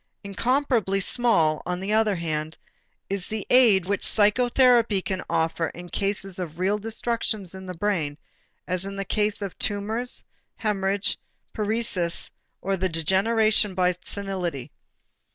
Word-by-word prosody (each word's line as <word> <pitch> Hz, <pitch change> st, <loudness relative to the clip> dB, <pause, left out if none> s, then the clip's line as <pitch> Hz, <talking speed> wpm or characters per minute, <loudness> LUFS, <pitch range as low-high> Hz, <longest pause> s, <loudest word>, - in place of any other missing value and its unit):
Incomparably 230 Hz, 0 st, 0 dB
small, 190 Hz, -8 st, +2 dB
on 180 Hz, 0 st, -3 dB
the 195 Hz, +3 st, -2 dB
other 215 Hz, -2 st, +3 dB
hand, 155 Hz, -2 st, -3 dB, 0.5 s
is 195 Hz, -2 st, -3 dB
the 215 Hz, -2 st, -4 dB
aid 225 Hz, -8 st, +6 dB
which 200 Hz, +1 st, -1 dB
psychotherapy 235 Hz, 0 st, +4 dB
can 190 Hz, 0 st, -3 dB
offer 165 Hz, 0 st, 0 dB
in 175 Hz, +1 st, -9 dB
cases 195 Hz, -1 st, -1 dB
of 170 Hz, -3 st, -5 dB
real 195 Hz, +3 st, 0 dB
destructions 220 Hz, -3 st, -2 dB
in 190 Hz, 0 st, -9 dB
the 180 Hz, -, -6 dB
brain, 165 Hz, -8 st, -1 dB, 0.5 s
as 185 Hz, 0 st, -2 dB
in 195 Hz, 0 st, -6 dB
the 195 Hz, 0 st, -4 dB
case 210 Hz, +1 st, 0 dB
of 195 Hz, -, -5 dB
tumors, 220 Hz, +4 st, -2 dB, 0.3 s
hemorrhage, 200 Hz, -2 st, 0 dB, 0.3 s
paresis 210 Hz, -6 st, 0 dB, 0.3 s
or 195 Hz, 0 st, 0 dB
the 185 Hz, +1 st, 0 dB
degeneration 200 Hz, +5 st, +2 dB
by 180 Hz, -1 st, +3 dB
senility. 185 Hz, -9 st, -4 dB
195 Hz, 135 wpm, -25 LUFS, 180-215 Hz, 0.5 s, aid